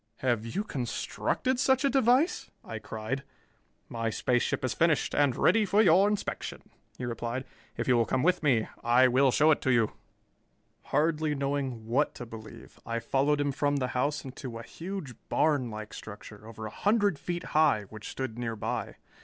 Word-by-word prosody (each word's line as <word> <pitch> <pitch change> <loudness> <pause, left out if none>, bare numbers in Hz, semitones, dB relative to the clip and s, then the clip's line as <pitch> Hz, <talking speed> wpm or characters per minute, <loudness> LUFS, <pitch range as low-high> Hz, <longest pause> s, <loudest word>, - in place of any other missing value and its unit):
"Have 120 -3 +1
you 195 - -2
constructed 215 - -2
such 265 0 +3
a - - +4
device?" 265 +6 +3
I 110 -1 -6
cried. 110 +5 -4 0.7
"My 115 -1 -2
space 125 +2 +1
ship - - -1
is 130 - -1
finished 165 -3 +2
and 140 -4 +3
ready 225 0 +4
for 200 +1 +2
your 190 -1 +6
inspection," 210 -1 -4 0.3
he 125 - -4
replied. 120 +2 -3 0.3
"If - - -2
you 125 -2 +4
will 115 - +2
come 130 - 0
with 180 +2 +3
me, 130 -8 +2 0.2
I 120 +2 +5
will 130 +2 +4
show 155 +5 +4
it 150 - +2
to 130 - +1
you." 115 -3 +3 0.9
Hardly 155 +1 +1
knowing 135 -4 -2
what 130 +6 +1
to 120 - -7
believe, 110 -2 -11
I 115 0 -3
followed 135 +5 +1
him 145 -1 +1
from 145 0 0
the 130 -3 -1
house 140 +5 -1
and 135 -2 -9
to 125 -5 -6
a 115 - -8
huge 170 -5 -6 0.2
barnlike 120 -8 0
structure, 105 0 -10
over 110 -1 -8
a 105 - -6
hundred 205 - +1
feet 175 0 -4
high, 150 -9 +4
which 110 -1 -8
stood 120 -3 -5
nearby. 115 -3 -3
135 Hz, 180 wpm, -29 LUFS, 115-160 Hz, 0.9 s, your